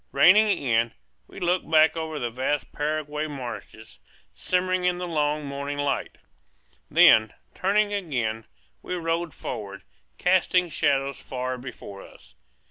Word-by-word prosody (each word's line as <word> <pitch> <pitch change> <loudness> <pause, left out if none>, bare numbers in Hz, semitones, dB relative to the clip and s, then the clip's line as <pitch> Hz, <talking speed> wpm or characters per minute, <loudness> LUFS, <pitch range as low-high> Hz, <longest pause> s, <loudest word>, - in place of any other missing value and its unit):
Reining 210 +5 +6
in, 115 -4 +1 0.3
we - - -11
looked 180 +1 0
back 160 0 +5
over 160 -1 -4
the 120 -4 -3
vast 130 +4 -2
Paraguayan 150 0 -3
marshes, 115 - -8 0.3
shimmering 185 0 0
in 180 0 +1
the 180 0 -4
long 150 -2 0
morning 140 +1 -4
lights. 145 -1 -2 0.7
Then, 110 -1 +6 0.2
turning 205 +2 +1
again, 120 - -2 0.4
we 180 - -4
rode 165 -1 -2
forward, 105 -7 -7 0.3
casting 180 -1 +2
shadows 140 -3 0
far 130 0 -4
before 100 -6 -9
us. 60 - -16
150 Hz, 125 wpm, -25 LUFS, 125-175 Hz, 0.7 s, Reining